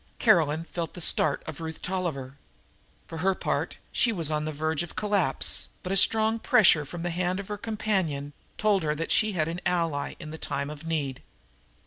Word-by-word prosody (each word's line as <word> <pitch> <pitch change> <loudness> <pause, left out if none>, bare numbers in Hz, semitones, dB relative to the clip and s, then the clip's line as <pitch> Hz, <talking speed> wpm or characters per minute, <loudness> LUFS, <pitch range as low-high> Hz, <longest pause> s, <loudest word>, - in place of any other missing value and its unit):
Caroline 165 -8 +4
felt 170 -1 -5
the - - -7
start 155 -3 +2
of 160 0 -7
Ruth 160 0 -5
Tolliver. 145 -8 -3 0.7
For 165 - -7
her 190 +2 +2
part - - -2
she 235 - +2
was 165 -7 -2
on 150 0 0
the 155 - -2
verge 155 0 -1
of 175 - -6
collapse, 205 -3 +1 0.2
but 185 - -4
a - - +2
strong 220 +3 +4
pressure 170 -9 +5
from 170 +4 -7
the 175 - -1
hand 180 +2 -1
of 200 - -7
her 210 - -2
companion 190 -10 -1 0.2
told 210 -3 +3
her 150 -1 0
that 165 +2 -3
she 215 -1 +3
had 155 -4 0
an 170 +2 -4
ally 165 -5 0
in 155 -2 -8
the 160 - -8
time 140 +1 -3
of 150 +2 -9
need. 145 -5 -2
165 Hz, 195 wpm, -27 LUFS, 150-190 Hz, 0.7 s, pressure